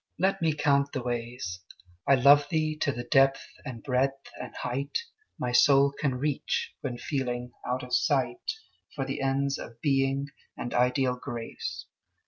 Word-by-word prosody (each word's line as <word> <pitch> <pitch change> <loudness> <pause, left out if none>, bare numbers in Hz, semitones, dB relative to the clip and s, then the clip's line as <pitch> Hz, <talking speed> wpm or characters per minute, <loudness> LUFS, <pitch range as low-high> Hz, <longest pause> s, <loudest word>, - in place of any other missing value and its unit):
Let 190 +1 +1
me 160 -2 +2
count 140 -1 +2
the 130 - -2
ways. 120 -7 -4 0.5
I 135 - +7
love 140 +2 +6
thee 155 -1 0
to 145 - +1
the 120 -2 -5
depth 135 0 +3 0.2
and 125 -5 -7
breadth 135 0 0
and - - -7
height 140 +3 -2 0.4
My 125 - -2
soul 140 +2 +6
can 140 -2 -1
reach, 140 +2 -1
when 125 -3 -3
feeling 125 -2 -3 0.2
out 125 +1 -1
of 125 0 -8
sight 130 -5 +1 0.4
For 135 -2 -2
the 135 +1 -3
ends 135 +1 0
of 115 0 -9
Being 135 0 +1 0.3
and 120 - -4
ideal 125 +1 +2
Grace. 115 -8 -6
135 Hz, 155 wpm, -28 LUFS, 125-140 Hz, 0.5 s, I